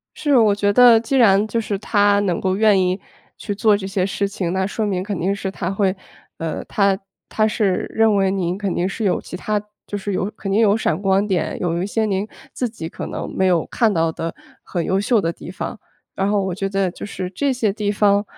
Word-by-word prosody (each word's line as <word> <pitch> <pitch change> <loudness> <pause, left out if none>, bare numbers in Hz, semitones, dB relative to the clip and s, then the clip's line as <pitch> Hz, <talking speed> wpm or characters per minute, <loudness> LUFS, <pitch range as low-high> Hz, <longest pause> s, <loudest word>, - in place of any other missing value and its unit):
是。 290 -3 +2
我 215 -3 +4
觉 205 0 +1
得 240 +1 +7
既 235 +4 -1
然 210 -4 +5
就 230 +2 -1
是 210 -3 -3
他 205 0 +3
能 185 -4 0
够 190 0 0
愿 210 -3 +4
意 185 +1 +1 0.4
去 205 - -4
做 210 0 +3
这 195 -1 -5
些 195 -1 0
事 200 +1 -1
情， 185 -3 -3
那 190 0 0
说 215 +2 -2
明 185 -3 -1
肯 200 -2 -4
定 190 +4 0
是 200 -1 -4
他 185 -2 -3
会 195 -1 +1 0.4
呃， 165 -1 -4
他 200 -2 +2 0.3
他 215 - +1
是 205 -4 0
认 220 -1 +3
为 195 -1 +2
您 185 -2 -1
肯 200 -3 -2
定 180 +2 0
是 215 +3 -4
有 190 - +1
其 - - -8
它 210 +2 -1 0.3
就 205 - -4
是 200 0 -4
有 190 +2 -1
肯 195 - -5
定 200 +3 +3
有 210 -2 +4
闪 220 - -1
光 195 0 +2
点， 185 -5 -1
有 170 0 -1
一 - - -1
些 220 +2 0
您 195 0 -1 0.3
自 250 - -2
己 165 -8 -7
可 - - -7
能 - - -5
没 190 - +2
有 175 -3 +2
看 225 -3 +1
到 165 -3 +1
的 165 +1 -4 0.3
很 175 -3 -3
优 190 +1 +1
秀 220 +2 +2
的 165 -3 -1
地 170 - -10
方。 205 +4 -5 0.4
然 195 +1 0
后 205 - +2
我 190 -2 -2
觉 195 +1 -2
得 195 -1 0
就 - - -8
是 190 -3 -5
这 275 +9 0
些 230 -5 0
地 210 0 -2
方 205 0 +3
200 Hz, 260 characters per minute, -20 LUFS, 190-210 Hz, 0.4 s, 得